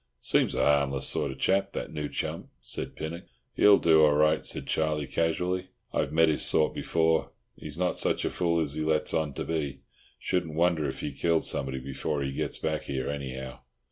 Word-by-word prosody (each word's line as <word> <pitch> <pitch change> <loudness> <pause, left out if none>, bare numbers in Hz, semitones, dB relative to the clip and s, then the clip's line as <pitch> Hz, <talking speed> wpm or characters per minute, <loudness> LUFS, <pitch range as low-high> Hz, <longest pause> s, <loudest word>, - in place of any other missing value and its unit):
"Seems - - +2
a - - +2
harmless 70 -2 +2
sort 75 - 0
of 65 - -9
chap, 95 +1 +1
that - - -5
new 75 -2 -3
chum," - - -4 0.2
said - - -3
Pinnock. 85 +2 -6 0.3
"He'll 105 -1 +6
do 80 -1 +5
all 75 -1 +6
right," 75 +1 +3
said - - -2
Charlie 75 -2 0
casually. 90 +4 -1 0.3
"I've 70 - 0
met 80 +1 +4
his 80 - +1
sort 75 - +2
before. 80 -1 +1 0.3
He's 75 0 -9
not 90 0 0
such - - +1
a - - -1
fool 85 -2 +1
as 75 -3 0
he 80 - -3
lets 80 0 +1
on 75 -4 -1
to - - -3
be. 75 -4 -3 0.4
Shouldn't 80 -4 -2
wonder 85 -2 +2
if - - -5
he - - -3
killed 85 -1 +1
somebody 65 -1 0
before 70 +2 -3
he 70 - -2
gets 70 - -3
back 80 -1 -2
here, 65 0 -2
anyhow." 65 -2 -6
75 Hz, 200 wpm, -28 LUFS, 70-80 Hz, 0.4 s, He'll